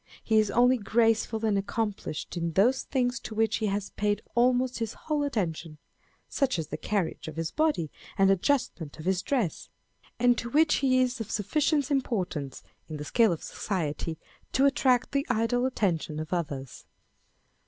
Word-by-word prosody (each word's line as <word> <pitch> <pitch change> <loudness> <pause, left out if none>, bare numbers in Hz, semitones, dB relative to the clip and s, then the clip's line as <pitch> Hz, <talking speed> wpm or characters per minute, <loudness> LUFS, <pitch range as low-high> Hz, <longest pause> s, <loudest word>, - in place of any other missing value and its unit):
He 220 -1 +3
is 215 -1 +2
only 245 +3 +4
graceful 225 +1 +1
and 205 -2 +2
accomplished 200 -6 -3
in 170 -1 -2
those 240 +9 +3
things 245 -3 -1
to 220 - -8
which 220 -1 +2
he 215 -2 -1
lias 200 0 -3
paid 205 0 -1
almost 250 +1 +2
his 225 -2 -3
whole 305 -2 -2
attention, 170 - -2 0.5
such 265 -7 0
as 155 -2 -4
the - - -3
carriage 195 -7 -2
of 155 - -7
his 165 0 -3
body, 300 - 0 0.3
and 195 -1 +5
adjustment 190 - 0
of 155 - -9
his 185 -1 +1
dress; 240 - -1 0.5
and 245 -1 +3
to 235 - -5
which 305 +4 +4
he 255 -2 +3
is 250 0 -2
of 225 - -5
sufficient 290 - 0
importance 185 - -2 0.3
in 155 - -5
the 150 - -6
scale 225 +4 +3
of 165 - -3
society 165 -4 -3 0.4
to 270 - +4
attract 260 -3 +3
the 280 0 +1
idle 245 +2 +1
attention 170 -10 -1
of 155 +3 -5
others. 140 -7 -4
220 Hz, 170 wpm, -28 LUFS, 175-255 Hz, 0.5 s, and